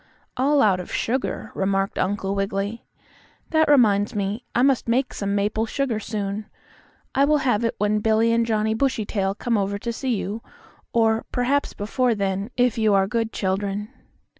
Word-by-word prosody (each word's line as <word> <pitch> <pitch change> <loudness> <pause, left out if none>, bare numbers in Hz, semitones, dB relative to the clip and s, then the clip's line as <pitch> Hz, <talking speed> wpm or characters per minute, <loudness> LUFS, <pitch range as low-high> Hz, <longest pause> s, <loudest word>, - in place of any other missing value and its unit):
"All 280 +3 +3
out 195 -4 +3
of 180 - -7
sugar," 255 +3 -2
remarked 195 0 -1
Uncle 195 +1 -1
Wiggily. 200 +2 -2 0.7
"That 315 -1 +3
reminds 215 -6 +4
me, 205 +3 -2
I 245 - +3
must 270 -3 +2
make 255 +3 +1
some 200 0 -2
maple 210 +2 0
sugar 255 -3 -1
soon. 205 0 -4 0.7
I 275 - +3
will 300 +2 +4
have 235 -3 +2
it 230 - 0
when 210 0 +1
Billie 220 +2 +2
and 230 0 +3
Johnnie 220 -1 0
Bushytail 215 -6 -1
come 230 -1 0
over 200 +1 -1
to 235 +3 -4
see 255 0 -1
you; 210 +2 -4 0.5
or, 225 -1 +2
perhaps 265 +3 0
before 235 +3 0
then, 195 +1 -2
if 245 -1 +2
you 215 -2 +3
are 195 -1 +4
good 225 +2 -1
children." 200 +2 -2
220 Hz, 165 wpm, -23 LUFS, 200-240 Hz, 0.7 s, reminds